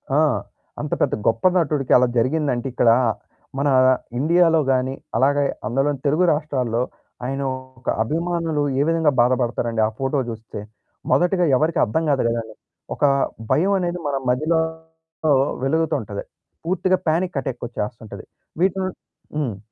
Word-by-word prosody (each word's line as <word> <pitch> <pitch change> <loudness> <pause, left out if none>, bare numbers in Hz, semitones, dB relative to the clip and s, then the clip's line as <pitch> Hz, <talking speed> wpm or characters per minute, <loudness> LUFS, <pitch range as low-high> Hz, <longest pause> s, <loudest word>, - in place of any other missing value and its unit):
ఆ! - - +4 0.6
అంత - - -5
పెద్ద - - +2
గొప్ప 115 0 +1
నటుడికి 150 -6 0
అలా 125 0 +3
జరిగిందంటే 130 0 0
ఇక్కడ 120 -1 +3 0.7
మన 140 +1 +1 0.5
ఇండియాలో 165 +2 +4
గాని 130 0 +1 0.2
అలాగే, 140 +3 +3 0.2
అందులోని 135 +4 0
తెలుగు 155 +6 +3
రాష్ట్రాల్లో 130 -6 -1 0.4
ఆయన 135 +2 -2 0.4
ఒక 130 - -5
అభిమానులు 165 +1 -1 0.2
ఏ - - +4
విధంగా 165 -3 +3
బాధపడతారండి. 120 -2 +1
ఆ - - -2
ఫోటో 135 +1 0
జూస్తే. 110 -2 -7 0.5
మొదటిగా 180 0 +3
ఎవరికీ 155 +4 +1
అర్థం 160 +10 -1
కాదు 140 -2 +2
కదండీ. 115 -2 -3 0.4
ఒక - - -5 0.5
భయం 185 +6 +3
అనేది 175 0 -2
మన 140 - -1
మదిలో 155 +6 +2 1.0
వెలుగుతుంటది. 160 - -1 0.4
పూర్తిగా 185 +1 +1
పానిక్ 170 +1 0
అటాక్ 135 -2 -5
వచ్చేస్తుంటది. 110 -2 -6 0.4
వీటి 190 0 +2
నుం 185 - -2 0.5
హ్మ్. 125 -10 -2
145 Hz, 130 wpm, -22 LUFS, 125-165 Hz, 1.0 s, ఆ